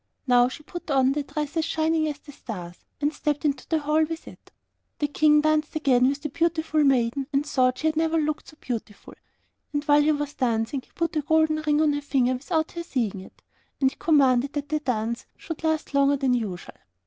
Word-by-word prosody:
Now 245 -2 +5
she 300 - -10
put 345 +1 -9
on 265 -2 +3
the 295 +2 -1
dress 295 +2 -4
as 325 - +2
shining 320 -1 +1
as 295 -2 -3
the 290 - -14
stars, 180 -10 -9
and 295 +1 0
stepped 295 0 -2
into 285 -2 -1
the 320 - +2
hall 300 0 0
in 315 0 +2
it. - - -14 0.5
The 295 - 0
King 300 +1 +4
danced 310 0 +1
again 255 -5 +3
with 280 +1 -4
the 300 - -2
beautiful 320 0 +1
maiden, 265 0 +2
and 280 0 +1
thought 255 -3 +2
she 310 - -5
had 315 0 +2
never 325 +1 +1
looked 305 -1 -1
so 310 - -15
beautiful. 225 -4 -6 0.6
And 290 -1 -1
while 290 0 +5
he 305 +1 +3
was 290 -1 -2
dancing, 235 +2 -1
he - - -27
put 335 -1 -1
a - - +2
gold 315 +1 +3 0.2
ring 295 0 +3
on 300 -2 +3
her 290 - -2
finger 260 -3 +1
without 315 +5 -1
her 340 - -5
seeing 235 - -2
it, 190 - -14 0.4
and 265 -1 +3
he - - -15
commanded 275 -4 +3
that 290 -1 -4
the 305 0 0
dance 235 -4 -2
should 325 -2 -7
last 315 -2 -1
longer 280 0 +3
than 265 -2 +1
usual. 210 -7 -4
290 Hz, 220 wpm, -25 LUFS, 255-310 Hz, 0.6 s, Now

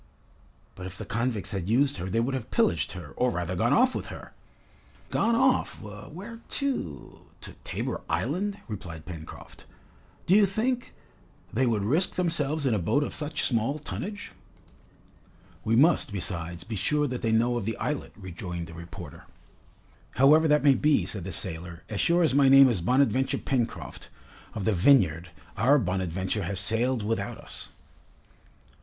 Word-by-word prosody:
"But 90 0 -8
if 95 +1 -10
the - - -6
convicts 115 -2 -2
had 95 -2 -3
used 135 +3 +2
her, 90 +1 -4
they 115 - +1
would 125 +4 0
have 130 -4 -4
pillaged 80 -3 +1
her, 85 -6 -9
or 125 - +2
rather 90 -4 -3
gone 115 +7 +1
off 255 +2 +4
with - - -4
her." - - -10 0.8
"Gone 230 0 +2
off! 260 +2 +2
where 155 - -9
to 255 - -3
to - - -9
Tabor - - -4
Island?" 195 - -1
replied 85 -7 -7
Pencroft. 80 -3 -10 0.6
"Do 180 - +3
you 205 -1 +6
think, 245 +6 -2 0.6
they 130 +3 +2
would 110 -4 +1
risk 155 - +1
themselves 160 -4 0
in 130 - +2
a 105 - +1
boat 140 - +1
of - - -4
such 150 0 -3
small 120 +4 +1
tonnage?" 205 +7 -6 1.3
"We 110 +1 +1
must, 150 0 +4
besides, 85 -3 -3
be 110 - -6
sure 150 +9 +1
that 125 -3 -3
they 115 - 0
know 120 +2 +2
of 120 -5 -2
the 115 - -2
islet," 150 -1 -3
rejoined 90 -3 -6
the 85 - -11
reporter. 85 +1 -10 0.9
"However 150 +5 +6
that 150 -2 +3
may 140 -2 +6
be," 150 +3 +2
said 100 -5 -5
the 95 - -4
sailor, 85 0 -1
"as 105 - -1
sure 170 +1 +3
as 155 - +2
my 140 -1 +5
name 135 0 +9
is 105 -8 0
Bonadventure 130 +4 +2
Pencroft, 125 -4 -3 0.5
of 105 - -3
the 110 - +2
Vineyard, 90 - +3 0.3
our 130 +7 +5
'Bonadventure' 95 - -1
has 95 +1 0
sailed 115 +4 +1
without 115 +2 -2
us!" - - -8
115 Hz, 165 wpm, -27 LUFS, 95-145 Hz, 1.3 s, name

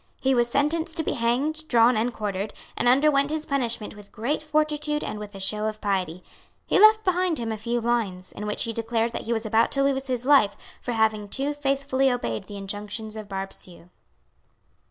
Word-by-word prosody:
He 265 0 +2
was 240 -1 +2
sentenced 320 +5 0
to 320 - +1
be - - -1
hanged, 280 +7 -1
drawn 235 -1 +5
and 225 +3 +1
quartered, 205 -2 -4 0.2
and - - 0
underwent 275 +2 +4
his 310 0 -2
punishment 240 -7 -2
with 205 -1 -14
great 245 +8 -2
fortitude 300 -1 0
and 215 - -4
with 210 -1 -8
a - - -7
show 210 +2 -1
of 215 0 -4
piety. 185 -4 -2 0.4
He - - +2
left 435 +1 +7
behind 365 -3 +1
him 230 -1 -3
a - - -1
few 235 +2 -1
lines, 220 -6 -1
in 210 - -6
which 210 - 0
he 230 - -3
declared 230 0 -1
that - - -5
he 230 - -3
was 225 0 -2
about 220 +1 +3
to 275 - +2
lose 275 -1 0
his 250 -1 -2
life 270 -8 +5 0.2
for 245 - -3
having 220 -2 +1
too 275 +6 -1
faithfully 275 -2 +1
obeyed 115 - -2
the 205 - -8
injunctions 210 +2 -5
of 215 -2 -8
Barbesieux. 190 -3 -8
235 Hz, 200 wpm, -25 LUFS, 210-280 Hz, 0.4 s, left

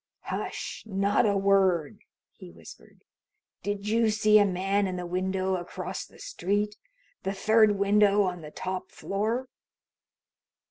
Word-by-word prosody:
"Hush! - - -5
Not 200 +1 +2
a 200 -1 +2
word!" 190 -6 +2 0.3
he - - -13
whispered. 80 -7 -15 0.6
"Did 205 +1 -3
you 225 +1 +3
see 215 0 +5
a 205 - +5
man 195 +1 0
in 185 - -3
the 180 -1 -4
window 185 +1 -1
across 175 - -6
the - - -19
street? 210 - -2 0.5
The 195 - -2
third 215 +2 +4
window 205 +1 +4
on 180 -2 -3
the 150 - -9
top 185 +3 -5
floor?" 220 +6 -2
195 Hz, 135 wpm, -27 LUFS, 185-210 Hz, 0.6 s, see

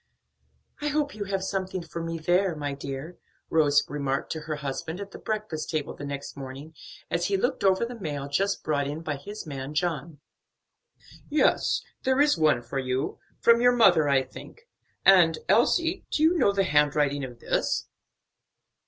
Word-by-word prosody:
"I 295 - -1
hope 295 -1 0
you 210 -1 -5
have 195 -1 -2
something 190 -2 -3
for 170 - -6
me 165 0 -3
there, 175 +2 +1
my 145 -2 -3
dear," 140 +4 -7 0.3
Rose 145 -3 +4
remarked 140 -1 -2
to 160 - -3
her 155 0 -4
husband 150 +4 -5
at 200 -1 -7
the - - -10
breakfast 215 -7 -3
table 155 -3 -2
the 145 - -7
next 140 0 -6
morning, 140 +3 -8 0.4
as 170 0 +1
he 200 -1 +1
looked 250 +6 -1
over 195 +3 +3
the 240 0 -8
mail 145 -6 -4
just 195 +8 0
brought 145 -2 0
in 150 +3 -4
by 155 -3 -3
his 205 +10 -8
man 140 -1 -6
John. 155 -2 -2 1.1
"Yes, 300 - +2 0.2
there 260 +1 +1
is 290 +1 +5
one 155 -7 +2
for 135 - -4
you; 130 0 -2 0.2
from 235 0 +5
your 245 0 +5
mother, 175 -10 +5
I 135 -1 +4
think; 450 - -12 0.4
and, 175 -4 +6
Elsie, 335 - +2
do 305 - 0
you 330 +3 +5
know 255 - +4
the 200 0 +1
handwriting 145 -3 +2
of 125 -2 -7
this?" - - -1
160 Hz, 175 wpm, -27 LUFS, 145-200 Hz, 1.1 s, and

